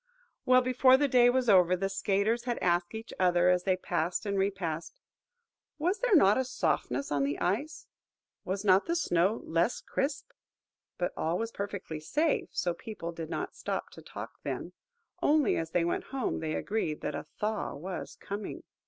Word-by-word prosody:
Well, 255 Hz, 0 st, +6 dB
before 255 Hz, +1 st, +5 dB
the 290 Hz, +1 st, +2 dB
day 245 Hz, -2 st, +5 dB
was 255 Hz, 0 st, +1 dB
over, 185 Hz, -3 st, +6 dB
the 195 Hz, +2 st, -1 dB
skaters 200 Hz, +4 st, 0 dB
had 240 Hz, -2 st, -1 dB
asked 175 Hz, +3 st, 0 dB
each 225 Hz, +1 st, -7 dB
other, 180 Hz, -1 st, +4 dB
as 180 Hz, 0 st, +2 dB
they 185 Hz, -2 st, +2 dB
passed 180 Hz, +2 st, -2 dB
and 200 Hz, -1 st, -1 dB
repassed, 190 Hz, -, -2 dB, 0.8 s
"Was 355 Hz, +7 st, 0 dB
there -, -, +3 dB
not 210 Hz, -, +6 dB
a -, -, +2 dB
softness 140 Hz, -, -1 dB
on 145 Hz, -1 st, +1 dB
the 140 Hz, +1 st, -1 dB
ice?"–"Was 200 Hz, -, -5 dB
not 190 Hz, 0 st, +5 dB
the 340 Hz, -, +1 dB
snow 190 Hz, -, +1 dB
less 170 Hz, +8 st, +1 dB
crisp?" 280 Hz, -, -3 dB, 0.7 s
But 175 Hz, -, -1 dB
all 165 Hz, +2 st, 0 dB
was 230 Hz, +2 st, -3 dB
perfectly 200 Hz, -7 st, -5 dB
safe, 300 Hz, -, 0 dB
so 175 Hz, -, -1 dB
people 190 Hz, -5 st, -7 dB
did 165 Hz, -1 st, -7 dB
not -, -, -4 dB
stop -, -, -4 dB
to -, -, -12 dB
talk -, -, -9 dB
then: -, -, -5 dB, 0.5 s
only, 300 Hz, -1 st, +3 dB
as 165 Hz, 0 st, -2 dB
they 170 Hz, 0 st, +1 dB
went 170 Hz, -, -1 dB
home, 270 Hz, -3 st, -2 dB
they 155 Hz, -1 st, -2 dB
agreed 200 Hz, -8 st, -2 dB
that -, -, -3 dB
a -, -, -5 dB
thaw 215 Hz, 0 st, -2 dB
was 180 Hz, +5 st, -6 dB
coming. 200 Hz, +1 st, -6 dB
195 Hz, 175 wpm, -30 LUFS, 175-250 Hz, 0.8 s, Well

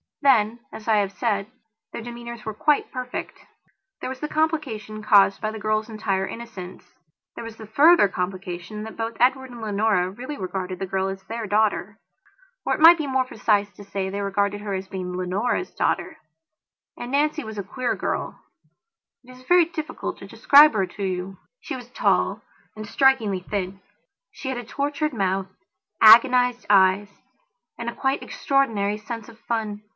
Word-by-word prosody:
Then, 235 Hz, -4 st, +4 dB
as 220 Hz, -, -10 dB
I 220 Hz, -1 st, +4 dB
have 200 Hz, -2 st, +1 dB
said, 200 Hz, -1 st, -1 dB, 0.4 s
their -, -, -6 dB
demeanours 235 Hz, -1 st, -8 dB
were 220 Hz, -, -4 dB
quite 295 Hz, +7 st, +1 dB
perfect. 255 Hz, -1 st, -6 dB, 0.6 s
There -, -, -4 dB
was 260 Hz, 0 st, -6 dB
the 300 Hz, -, -3 dB
complication 275 Hz, -10 st, -2 dB
caused 200 Hz, -2 st, +5 dB
by 215 Hz, -, -1 dB
the 220 Hz, -, -7 dB
girl's 215 Hz, +1 st, -1 dB
entire 195 Hz, -3 st, -1 dB
innocence; 200 Hz, -6 st, -9 dB, 0.5 s
there -, -, -7 dB
was 230 Hz, -1 st, -9 dB
the 220 Hz, -, -9 dB
further 285 Hz, +3 st, +6 dB
complication 185 Hz, +2 st, -5 dB
that 220 Hz, -, -9 dB
both 225 Hz, 0 st, -4 dB
Edward 260 Hz, +2 st, +2 dB
and 240 Hz, -2 st, -10 dB
Leonora 205 Hz, -3 st, +1 dB
really 255 Hz, +8 st, -7 dB
regarded 185 Hz, -1 st, -4 dB
the 195 Hz, -, -2 dB
girl 190 Hz, +1 st, -1 dB
as 195 Hz, 0 st, -6 dB
their 225 Hz, -1 st, -5 dB
daughter. 210 Hz, 0 st, 0 dB, 0.7 s
Or -, -, +1 dB
it -, -, -8 dB
might 330 Hz, +2 st, +8 dB
be 300 Hz, -, -2 dB
more 260 Hz, -1 st, +1 dB
precise 205 Hz, -4 st, 0 dB
to 205 Hz, -, -12 dB
say 195 Hz, -1 st, -4 dB
that 190 Hz, -, -4 dB
they 200 Hz, +1 st, -3 dB
regarded 200 Hz, +1 st, -1 dB
her 205 Hz, -1 st, -4 dB
as 190 Hz, 0 st, -4 dB
being 185 Hz, -2 st, -5 dB
Leonora's 195 Hz, -, -1 dB
daughter. -, -, -1 dB, 0.8 s
And 240 Hz, +1 st, -6 dB
Nancy 300 Hz, +2 st, +1 dB
was 220 Hz, -1 st, -8 dB
a 200 Hz, -, -3 dB
queer 245 Hz, +5 st, -2 dB
girl; -, -, -3 dB, 0.8 s
it 255 Hz, -, -15 dB
is 255 Hz, -, -16 dB
very 350 Hz, +4 st, +5 dB
difficult 320 Hz, -1 st, -5 dB
to -, -, -10 dB
describe 290 Hz, 0 st, +6 dB
her 195 Hz, -3 st, +1 dB
to 200 Hz, +2 st, -8 dB
you. 185 Hz, 0 st, -3 dB, 0.2 s
She -, -, -5 dB
was 245 Hz, -2 st, -10 dB
tall -, -, +1 dB, 0.3 s
and 215 Hz, -1 st, -7 dB
strikingly 230 Hz, -6 st, +2 dB
thin; 190 Hz, 0 st, -4 dB, 0.5 s
she 265 Hz, -, -7 dB
had 260 Hz, -, -3 dB
a -, -, -6 dB
tortured 290 Hz, +5 st, -2 dB
mouth, 195 Hz, -3 st, -1 dB, 0.5 s
agonized 245 Hz, +2 st, +6 dB
eyes, 195 Hz, 0 st, +4 dB, 0.7 s
and 235 Hz, 0 st, -4 dB
a -, -, -8 dB
quite 270 Hz, +1 st, 0 dB
extraordinary 220 Hz, -7 st, 0 dB
sense 230 Hz, +1 st, -7 dB
of 230 Hz, -1 st, -15 dB
fun. 215 Hz, -3 st, -3 dB
220 Hz, 175 wpm, -24 LUFS, 200-255 Hz, 0.8 s, might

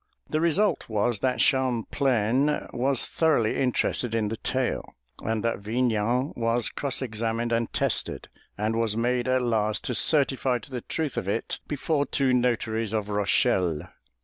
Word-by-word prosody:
The 155 Hz, -, -1 dB
result 170 Hz, -, +2 dB
was 110 Hz, +1 st, 0 dB
that 130 Hz, +2 st, +1 dB
Champlain 130 Hz, 0 st, +1 dB
was 130 Hz, +1 st, +1 dB
thoroughly 150 Hz, -9 st, +2 dB
interested 125 Hz, -2 st, 0 dB
in 110 Hz, -2 st, 0 dB
the 115 Hz, -, -4 dB
tale, 130 Hz, +2 st, -2 dB, 0.3 s
and 110 Hz, -1 st, -1 dB
that 115 Hz, -, 0 dB
Vignan 120 Hz, +3 st, 0 dB
was 115 Hz, 0 st, 0 dB
cross 140 Hz, -1 st, -1 dB
examined 115 Hz, 0 st, -2 dB
and 115 Hz, 0 st, 0 dB
tested, -, -, -1 dB, 0.3 s
and 110 Hz, +2 st, 0 dB
was 110 Hz, -2 st, +1 dB
made 120 Hz, +1 st, 0 dB
at 130 Hz, 0 st, +2 dB
last 110 Hz, -3 st, +1 dB
to 125 Hz, -, -1 dB
certify 135 Hz, 0 st, +3 dB
to 120 Hz, -, -13 dB
the 125 Hz, -2 st, -4 dB
truth 150 Hz, -3 st, -3 dB
of 110 Hz, -5 st, -2 dB
it 105 Hz, +3 st, -2 dB
before 145 Hz, 0 st, 0 dB
two 135 Hz, -2 st, +1 dB
notaries 115 Hz, -3 st, 0 dB
of 105 Hz, -1 st, -1 dB
Rochelle. 95 Hz, -5 st, +1 dB
120 Hz, 150 wpm, -26 LUFS, 110-130 Hz, 0.3 s, certify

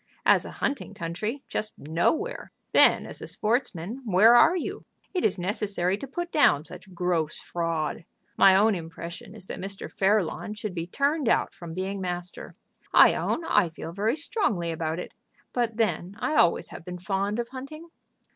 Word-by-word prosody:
As -, -, +5 dB
a -, -, -7 dB
hunting 275 Hz, -7 st, -3 dB
country, 210 Hz, +11 st, -4 dB
just 215 Hz, 0 st, -3 dB
nowhere. 175 Hz, -, -1 dB, 0.2 s
Then -, -, +6 dB
as -, -, -8 dB
a -, -, -6 dB
sportsman, 225 Hz, -1 st, -2 dB
where 215 Hz, +1 st, +6 dB
are 335 Hz, +9 st, +6 dB
you? 345 Hz, -, -4 dB, 0.3 s
It 365 Hz, -, -1 dB
is 195 Hz, -, +2 dB
necessary 190 Hz, -1 st, -1 dB
to 275 Hz, -, -6 dB
put 345 Hz, +6 st, -4 dB
down 155 Hz, -, +4 dB
such 190 Hz, -, -10 dB
gross 170 Hz, -3 st, 0 dB
fraud. 165 Hz, -1 st, -3 dB, 0.3 s
My 190 Hz, -1 st, +7 dB
own 210 Hz, +3 st, +5 dB
impression 170 Hz, +3 st, -7 dB
is 205 Hz, -4 st, -11 dB
that -, -, -7 dB
Mr. 195 Hz, +1 st, -6 dB
Fairlawn 205 Hz, +1 st, 0 dB
should 210 Hz, -2 st, -5 dB
be 170 Hz, -1 st, -4 dB
turned 280 Hz, -, 0 dB
out -, -, +2 dB
from 170 Hz, -2 st, -9 dB
being 190 Hz, +1 st, -3 dB
master. 180 Hz, -1 st, -5 dB, 0.4 s
I -, -, +7 dB
own 330 Hz, -, -1 dB
I 205 Hz, -, +3 dB
feel 160 Hz, 0 st, -8 dB
very 210 Hz, +7 st, 0 dB
strongly 215 Hz, -, -1 dB
about 160 Hz, 0 st, -2 dB
it. 180 Hz, -, -7 dB, 0.4 s
But 235 Hz, -3 st, -1 dB
then 200 Hz, -4 st, -1 dB
I 310 Hz, -, -1 dB
always 175 Hz, -, +3 dB
have -, -, -10 dB
been 180 Hz, +1 st, -7 dB
fond 195 Hz, +3 st, -1 dB
of 235 Hz, 0 st, -3 dB
hunting." 275 Hz, +6 st, -9 dB
195 Hz, 175 wpm, -26 LUFS, 175-235 Hz, 0.4 s, My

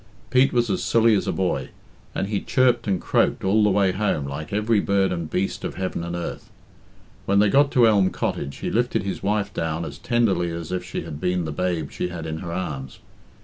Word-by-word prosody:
Pete 130 Hz, +1 st, +4 dB
was 120 Hz, -3 st, +1 dB
as -, -, -1 dB
silly 115 Hz, -1 st, +4 dB
as 100 Hz, -, +1 dB
a -, -, +1 dB
boy, 95 Hz, -1 st, -1 dB, 0.5 s
and -, -, 0 dB
he 100 Hz, 0 st, -2 dB
chirped 125 Hz, -3 st, +2 dB
and 95 Hz, -3 st, +1 dB
croaked -, -, +1 dB
all 105 Hz, +3 st, +3 dB
the 105 Hz, -, +4 dB
way 100 Hz, -1 st, +3 dB
home 95 Hz, -7 st, -1 dB
like 70 Hz, +2 st, -6 dB
every 105 Hz, +1 st, +2 dB
bird 100 Hz, -1 st, +1 dB
and 85 Hz, -3 st, -3 dB
beast 95 Hz, +1 st, -2 dB
of -, -, -4 dB
heaven 95 Hz, -2 st, -3 dB
and 85 Hz, 0 st, -4 dB
earth. 85 Hz, -, -5 dB, 0.8 s
When 100 Hz, -, +3 dB
they 105 Hz, 0 st, +5 dB
got 140 Hz, +5 st, +4 dB
to 120 Hz, -3 st, +6 dB
Elm 100 Hz, -4 st, +4 dB
Cottage, 70 Hz, 0 st, -3 dB
he -, -, -3 dB
lifted 120 Hz, -3 st, +1 dB
his 100 Hz, -, -4 dB
wife 100 Hz, 0 st, -1 dB
down 80 Hz, 0 st, -2 dB
as -, -, -8 dB
tenderly 115 Hz, -8 st, +1 dB
as 85 Hz, 0 st, -6 dB
if 90 Hz, -, -2 dB
she -, -, -5 dB
had 75 Hz, -, -8 dB
been 90 Hz, -1 st, 0 dB
the 80 Hz, -, -3 dB
babe 85 Hz, -2 st, -2 dB
she -, -, -2 dB
had 90 Hz, -2 st, -6 dB
in 80 Hz, 0 st, -4 dB
her 85 Hz, -1 st, -6 dB
arms. 70 Hz, -7 st, -4 dB
95 Hz, 225 wpm, -23 LUFS, 85-105 Hz, 0.8 s, to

